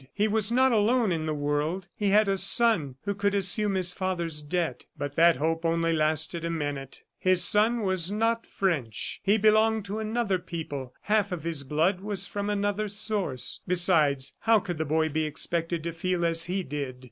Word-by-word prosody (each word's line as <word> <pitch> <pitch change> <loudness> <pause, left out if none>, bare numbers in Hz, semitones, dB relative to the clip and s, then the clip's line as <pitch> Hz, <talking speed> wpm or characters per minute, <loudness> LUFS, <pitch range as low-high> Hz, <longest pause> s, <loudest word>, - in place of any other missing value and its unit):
He 210 +1 +1
was 215 0 +1
not 260 +2 +3
alone 225 0 +2
in 160 -2 -2
the 155 - -1
world; 150 +5 -2
he 205 -2 -1
had 210 +1 +4
a 195 - +1
son 190 - +4
who 200 - -2
could 200 0 -1
assume 200 +1 +3
his 180 -1 0
father's 170 -5 -2
debt... 165 +3 -3
but 145 0 -5
that 170 0 +5
hope 165 +4 -2
only 165 0 +1
lasted 155 +2 0
a 170 - -2
minute. 145 -4 -5 0.2
His 185 -1 +4
son 215 +6 +4
was 190 -3 0
not 225 +2 -1
French; 150 - -2
he 205 +2 +2
belonged 220 0 +3
to 205 +2 -4
another 220 -3 -1
people; 150 -7 -7
half 210 -1 0
of 175 -4 -5
his 165 -3 -2
blood 155 +7 0
was 200 -1 -2
from 205 0 -4
another 205 +1 -1
source. 205 - -2
Besides, 165 -7 +2
how 225 -1 +3
could 175 -5 -6
the 160 - -1
boy 160 +2 +1
be 155 +1 -1
expected 165 +2 -3
to 170 0 -4
feel 175 +1 -1
as 165 0 +1
he 185 +1 -2
did? 140 -4 -5
180 Hz, 190 wpm, -27 LUFS, 160-205 Hz, 0.2 s, that